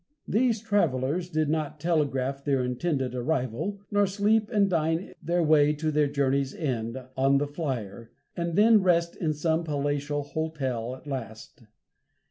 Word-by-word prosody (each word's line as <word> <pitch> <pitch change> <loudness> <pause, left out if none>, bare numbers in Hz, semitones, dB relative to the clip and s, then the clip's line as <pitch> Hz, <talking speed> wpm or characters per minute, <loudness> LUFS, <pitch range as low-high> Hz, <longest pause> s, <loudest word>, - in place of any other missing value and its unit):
These 230 -1 +2
travelers 175 - 0
did 155 -2 0
not 155 -1 -2
telegraph 140 -4 0
their 135 -3 +1
intended 130 +1 -1
arrival, 130 - -2
nor 205 -1 +3
sleep 210 +2 +1
and 205 -4 +3
dine 165 -1 -1
their 175 +2 +1
way 150 -1 +4
to 155 +1 -2
their 150 -1 +2
journey's 140 -1 0
end, 120 -5 -2 0.2
on 135 +1 +3
the 145 - +1
"Flyer," 125 - -5 0.3
and 170 -1 -2
then 215 +1 +6
rest 170 -2 +2
in 160 -3 -1
some 160 +2 0
palatial 145 -1 -1
hotel 135 -6 -3
at 130 - -16
last. 120 -4 -7
150 Hz, 145 wpm, -27 LUFS, 135-170 Hz, 0.3 s, then